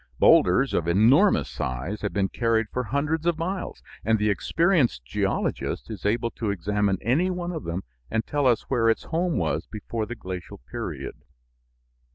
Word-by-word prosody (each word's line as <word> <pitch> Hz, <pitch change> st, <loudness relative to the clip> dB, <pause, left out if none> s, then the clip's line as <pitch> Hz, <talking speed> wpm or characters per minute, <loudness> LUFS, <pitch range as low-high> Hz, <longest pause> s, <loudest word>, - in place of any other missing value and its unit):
Bowlders 95 Hz, -, +5 dB
of 85 Hz, -, 0 dB
enormous 120 Hz, -, +4 dB
size 70 Hz, +12 st, -4 dB
have 105 Hz, -, -2 dB
been 100 Hz, -1 st, +1 dB
carried 115 Hz, 0 st, +1 dB
for 125 Hz, 0 st, -1 dB
hundreds 150 Hz, +7 st, -1 dB
of 170 Hz, -2 st, +2 dB
miles, 170 Hz, -, -4 dB, 0.2 s
and 110 Hz, +1 st, +3 dB
the 105 Hz, 0 st, +2 dB
experienced 140 Hz, -, +1 dB
geologist -, -, -2 dB
is -, -, -3 dB
able 115 Hz, +2 st, 0 dB
to 110 Hz, -, -3 dB
examine 100 Hz, +1 st, 0 dB
any 145 Hz, -, +2 dB
one 180 Hz, -1 st, -3 dB
of 160 Hz, -3 st, -5 dB
them 85 Hz, +3 st, -3 dB, 0.3 s
and 110 Hz, 0 st, -1 dB
tell 145 Hz, -2 st, +1 dB
us 120 Hz, -3 st, +3 dB
where 115 Hz, -4 st, +2 dB
its 115 Hz, -, +1 dB
home 170 Hz, 0 st, -1 dB
was 80 Hz, 0 st, -1 dB
before 110 Hz, +1 st, -4 dB
the 120 Hz, -, -5 dB
glacial 90 Hz, -4 st, -7 dB
period. -, -, -6 dB
115 Hz, 170 wpm, -25 LUFS, 100-150 Hz, 0.3 s, Bowlders